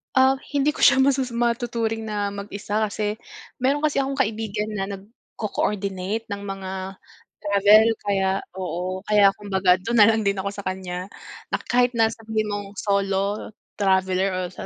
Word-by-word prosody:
Ah, 265 0 +4
hindi 285 +1 +2
ko - - -11
siya 275 -1 +6
masasa 265 -3 +1
matuturing 235 -2 -1
na 205 -1 -2
mag-isa 200 +1 -4
kasi, 210 +1 -3 0.4
meron 275 +4 +1
kasi 300 -2 +2
akong 275 0 -1
kaibigan 215 -3 -1
na 205 -2 -2
nagko-coordinate 200 0 -4
ng 200 0 -4
mga 195 -1 -5 0.7
travel. 205 +2 +6 0.2
Kaya 195 -2 0 0.3
oo. 185 0 -4
Kaya 205 -2 +5
kumbaga 190 -3 +2
doon 235 +3 0
na 205 - +8
lang 220 0 +2
din 200 0 +1
ako 195 +1 -2
sa 200 - -7
kanya 185 -1 -4 0.5
na - - +1
kahit 245 0 +2
na 225 -1 +4
sabihin 220 -1 -3
mong 205 -1 -4
solo 200 0 -1 0.3
traveler 190 -1 +2
o 185 - -1
sa 185 - -9
205 Hz, 155 wpm, -23 LUFS, 195-225 Hz, 0.7 s, na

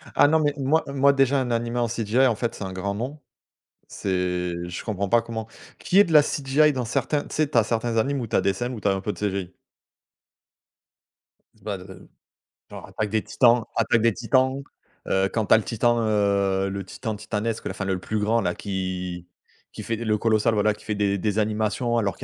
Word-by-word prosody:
Ah - - +6
non, 160 +2 +3
mais 145 -2 +1
moi, 145 +4 +2
moi, 140 0 +3
déjà, 135 0 +3
un 125 -2 -2
animé 120 +1 -1
en 120 - +1
CGI, 115 +3 +1
en 120 - +1
fait, 115 +2 -3
c'est - - -7
un 95 -1 -5
grand 100 +2 -3
non. 130 +8 -5 0.7
C'est 90 -2 -2 0.2
je 90 - -6
comprends 100 -3 -2
pas 120 +4 +4
comment. 115 -1 -5 0.3
Qu'il 185 - +1
y - - +10
ait - - +7
de 170 - -4
la 150 -1 +8
CGI 145 +2 +2
dans 130 -3 -2
certains, 145 +5 -1
tu - - -9
sais, 155 -1 +1
tu 140 - +2
as 115 - +4
certains 115 +1 -1
animes 135 +4 0
où 120 - -3
tu - - -7
as - - +4
des 100 - +1
scènes 120 +1 -3
où 110 - -7
tu 105 - 0
as - - +3
un 95 - -2
peu 105 - -2
de - - -12
CGI 95 -3 -3 2.1
bah 100 -2 -3
de 90 - -12 0.9
genre, - - -9
heu, - - -15
Attaque 105 -1 -3
des 110 +1 0
Titans, 120 -1 +3
Attaque 115 0 +2
des 115 0 +3
Titans, 130 +4 +1 0.5
heu, 95 0 +1
quand 110 -3 0
tu - - +5
as - - +8
le 110 - -1
Titan, 120 +2 +1
heu, 100 -2 +1
le 100 0 -4
Titan 110 +4 -5
titanesque, 110 +1 -3
là, - - -2
enfin, 95 +1 -5
le 95 - 0
le 95 - -3
plus 110 +4 -3
grand, 110 +3 +1
là, 90 -3 -1
qui 90 -3 -4 0.5
qui - - -7
fait 115 - -2
le 110 -1 0
Colossal, 110 0 +2
voilà 105 0 +2
qui - - -18
fait 105 - -2
des 100 -1 +1
des 105 +2 -1
animations 110 +3 0
alors 100 -5 0
qu'il - - -11
110 Hz, 235 wpm, -24 LUFS, 100-120 Hz, 2.1 s, y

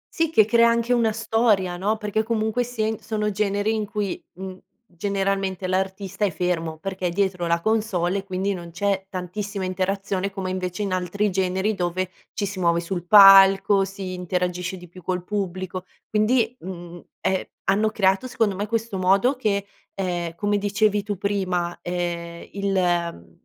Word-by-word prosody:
Sì, 330 -1 +2
che 220 -9 +5
crea 235 +1 +5
anche 235 +1 +1
una 230 -2 +3
storia, 220 -4 +1
no, 205 +5 0
perché 210 0 -1
comunque 220 +1 0
sia 240 -3 -2
in 220 -1 -2
sono 210 -1 -2
generi 205 +1 0
in 215 -2 -2
cui, 205 -2 -3
mhmm, 185 +1 -8 0.3
generalmente 195 0 -2
l'artista 190 +2 -2
è 205 - +4
fermo, 165 -2 -2
perché 190 +2 -3
è - - 0
dietro 180 -1 0
la 170 0 +1
console 200 -4 0
e - - -7
quindi 195 +1 -2
non 175 -2 -7
c'è 195 +2 -1
tantissima 195 +2 -4
interazione, 195 +1 -1
come 190 -1 -4
invece 185 +1 -3
in 195 -2 -2
altri 185 +3 0
generi 190 +3 0
dove 185 0 -2 0.2
ci 205 - -2
si 195 -1 -5
muove 170 -1 +3
sul 175 0 -4
palco, 195 0 +8
si 195 -1 -6
interagisce 180 0 -2
di 180 -1 -12
più 180 +2 -14
col 180 +1 -2
pubblico. 185 -2 -4 0.2
Quindi, 225 +2 +2
mhmm, 175 -1 -8 0.2
è 190 0 -1 0.2
hanno 210 +2 +2
creato, 195 +2 +2
secondo 225 -5 +1
me, 205 +2 -3
questo 225 -3 -2
modo 195 +9 +3
che, 200 -5 0 0.3
ehm, 175 -3 -2
come 205 +3 0
dicevi 205 +1 +2
tu 205 -1 -4
prima, 185 -3 -1
ehm, 170 -1 -4
il 175 - -1
195 Hz, 165 wpm, -24 LUFS, 180-210 Hz, 0.3 s, palco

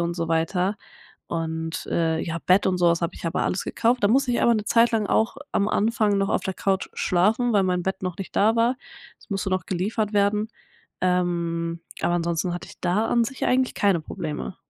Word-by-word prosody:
und 170 0 -1
so 170 -1 -2
weiter 180 +5 0 0.5
und, 160 -1 -3
äh, 160 -1 0
ja, 165 0 -3
Bett 185 +2 +4
und 185 -1 +1
sowas 170 -1 +3
habe 170 +1 -1
ich - - -11
aber 165 - -1
alles 185 - -1
gekauft. 240 +1 0
Da 205 - +4
musste 255 +2 +2
ich 240 - +1
aber 235 - +5
'ne 215 -2 -1
Zeit 230 +2 +4
lang 220 -3 0
auch 225 +6 +1 0.2
am 200 - +1
Anfang 215 -1 +1
noch 195 0 +1
auf - - +1
der 190 - -3
Couch 195 0 -1
schlafen, 215 +7 +2
weil 200 -2 +4
mein 180 -1 0
Bett 190 0 -3
noch 180 -2 -3
nicht 195 - -7
da 220 +3 +4
war. 235 +3 +2 0.4
Das - - -22
musste 195 -1 -2
noch 185 -3 -1
geliefert 210 +4 -1
werden, 205 +1 +2 0.5
ähm, 170 -2 0 0.2
aber 175 - +1
ansonsten 170 0 -1
hatte 175 - -7
ich - - -15
da 185 +5 +1
an 235 - +2
sich 265 +3 -4
eigentlich 255 0 +1
keine 195 -5 +2
Probleme. 155 +1 -5
190 Hz, 210 wpm, -24 LUFS, 170-215 Hz, 0.5 s, aber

